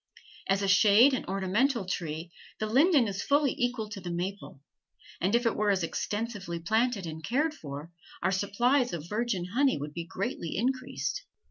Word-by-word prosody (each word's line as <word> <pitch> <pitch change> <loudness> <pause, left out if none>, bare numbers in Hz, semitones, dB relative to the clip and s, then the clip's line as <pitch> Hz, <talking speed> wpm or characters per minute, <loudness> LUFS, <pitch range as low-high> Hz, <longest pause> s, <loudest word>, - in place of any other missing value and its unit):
As 195 +1 +2
a - - +1
shade 210 +7 +6
and 260 - -2
ornamental 195 +5 +1
tree 165 -2 -4 0.3
the 215 - -2
linden 270 - +4
is 200 0 -3
fully 285 -1 +2
equal 245 -3 -1
to 205 -2 -7
the 175 - -6
maple, 180 -2 -4 0.6
and 195 +5 +2
if 240 +1 +2
it 230 - +2
were 210 0 +1
as 190 -3 +2
extensively 205 0 -3
planted 220 +3 +1
and 160 -1 -7
cared 300 - +1
for, 150 - -8 0.3
our 190 - +2
supplies 240 +7 +1
of 165 -1 -5
virgin 210 -3 -1
honey 275 +2 +3
would 145 +1 -6
be 170 +1 -5
greatly 195 -4 -4
increased. 260 - -2
205 Hz, 170 wpm, -29 LUFS, 180-245 Hz, 0.6 s, shade